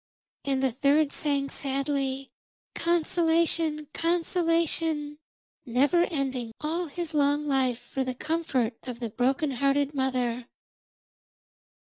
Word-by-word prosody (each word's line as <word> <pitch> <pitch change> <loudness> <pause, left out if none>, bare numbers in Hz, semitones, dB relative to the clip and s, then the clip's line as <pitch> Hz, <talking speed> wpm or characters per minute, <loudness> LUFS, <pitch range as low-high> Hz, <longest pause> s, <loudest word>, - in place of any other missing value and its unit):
And 270 -1 0
the 265 - +3
third 285 +3 +3
sang 280 -2 0
sadly 275 -1 -1 0.4
'Consolation! 330 -2 +1
Consolation!' 330 -3 0 0.4
never 285 +8 +3
ending 260 -7 -3
all 330 +3 -2
his 330 +2 -5
life 290 0 +2
long 265 -3 +2
for 265 +3 -4
the 255 -1 -3
comfort 270 -6 -1
of 245 -2 -7
the 230 -3 -4
broken 270 +5 +1
hearted 275 +2 +1
mother. 250 -3 -1
280 Hz, 105 wpm, -27 LUFS, 265-320 Hz, 0.4 s, the